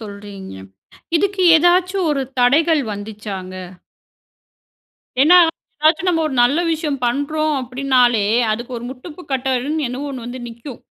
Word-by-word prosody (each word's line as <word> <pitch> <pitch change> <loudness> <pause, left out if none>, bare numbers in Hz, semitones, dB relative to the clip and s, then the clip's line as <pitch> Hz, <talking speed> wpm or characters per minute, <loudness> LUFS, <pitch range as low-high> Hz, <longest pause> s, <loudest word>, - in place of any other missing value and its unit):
சொல்றீங்க. 200 - -9 0.6
இதுக்கு 395 +2 0
ஏதாச்சு 360 +3 +2
ஒரு 275 -2 0 0.2
தடைகள் 305 +5 +3
வந்துச்சாங்க? 205 -3 -7 1.7
ஏன்னா, 335 +6 +7 0.4
ஏதாச்சும் 320 +4 +3
நம்ம 325 -2 +1
ஒரு 280 - -3
நல்ல 275 +7 +3
விஷயம் 300 -4 -3
பண்றோம் 305 +4 -1
அப்பிடினாலே, 250 -3 +1 0.3
அதுக்கு 240 +3 -5
ஒரு 235 - -9
முட்டுப்பு 300 +7 -10
கட்டன்னு, 265 +3 -1
என்னவோ 270 +4 -5
1 250 -3 -7
வந்து 245 +1 -7
நிக்கும். 235 +2 -10
270 Hz, 120 wpm, -19 LUFS, 240-310 Hz, 1.7 s, ஏன்னா